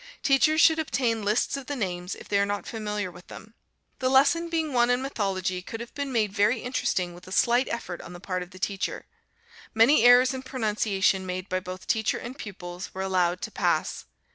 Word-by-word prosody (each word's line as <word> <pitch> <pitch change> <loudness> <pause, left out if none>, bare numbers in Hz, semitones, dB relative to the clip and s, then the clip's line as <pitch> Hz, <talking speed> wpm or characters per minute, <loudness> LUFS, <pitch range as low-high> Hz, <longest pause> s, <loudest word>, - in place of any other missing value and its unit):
Teachers 290 +3 +4
should 320 0 +6
obtain 240 -7 0
lists 210 +6 +1
of 275 -2 -7
the 290 - -3
names, 180 -5 -3
if - - -12
they 200 - +1
are - - +4
not 205 0 -3
familiar 210 -4 -4
with 175 +1 -15
them. 220 - -12 0.5
The 255 - +1
lesson 285 +6 +4
being 320 -3 -1
one 240 -1 +3
in 245 0 +3
mythology, 195 -8 -2
could 225 +5 -7
have 235 0 -8
been 280 -1 -4
made 215 -5 0
very 215 +4 +2
interesting 185 -8 -1
with 175 +1 -14
a - - -10
slight 240 +6 +3
effort 180 -7 -5
on - - -10
the 175 - -9
part 185 0 -3
of 180 - -7
the 185 - -14
teacher. 195 +1 -3 0.7
Many 225 +5 +6
errors 245 +2 +7
in 260 - -5
pronunciation 210 -6 0
made 185 +1 -4
by 185 - 0
both 185 0 -8
teacher 220 -2 0
and 245 +2 -7
pupils, 180 -7 -8
were 190 - -3
allowed 180 -2 +1
to - - -4
pass. - - -1
215 Hz, 210 wpm, -26 LUFS, 185-255 Hz, 0.7 s, errors